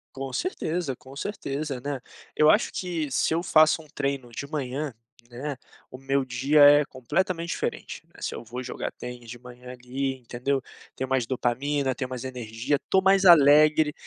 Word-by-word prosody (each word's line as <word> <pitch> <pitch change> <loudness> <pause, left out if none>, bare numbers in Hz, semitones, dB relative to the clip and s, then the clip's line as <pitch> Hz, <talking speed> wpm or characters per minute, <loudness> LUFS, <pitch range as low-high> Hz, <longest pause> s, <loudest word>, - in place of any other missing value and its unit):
Com 135 -1 -5
certeza, 170 - -2
om 135 +1 -12
certeza, 140 -6 -4
né. 140 -1 -4 0.3
Eu 155 0 +5
acho 210 - +3
que, 170 -5 -3
se 130 +5 +1
eu 170 - +1
faço 155 -1 +4
um 155 - -17
treino 140 -3 -3
de 130 +4 -6
manhã, 140 -1 -4 0.4
né, 135 +4 -5 0.3
o 130 - -10
meu 135 0 0
dia 135 +5 +2
é, 145 +1 +8
completamente 170 +7 -2
diferente, - - -4
né. - - -19
Se, - - -3
eu - - -7
vou 120 +3 -6
jogar 125 - -5
tênis 125 -1 -9
de 120 0 -8
manhã, 125 0 -11
ali, 130 +2 -4
entendeu. 125 +3 -2 0.4
Tenho 130 0 -3
mais 130 -3 +1
dopamina, 130 +2 -1
tenho 130 -2 -4
mais 130 0 -6
energia. 125 +2 -2
Tô 190 - +4
mais 195 0 +4
alegre, 150 -2 +6
135 Hz, 175 wpm, -26 LUFS, 125-150 Hz, 0.4 s, é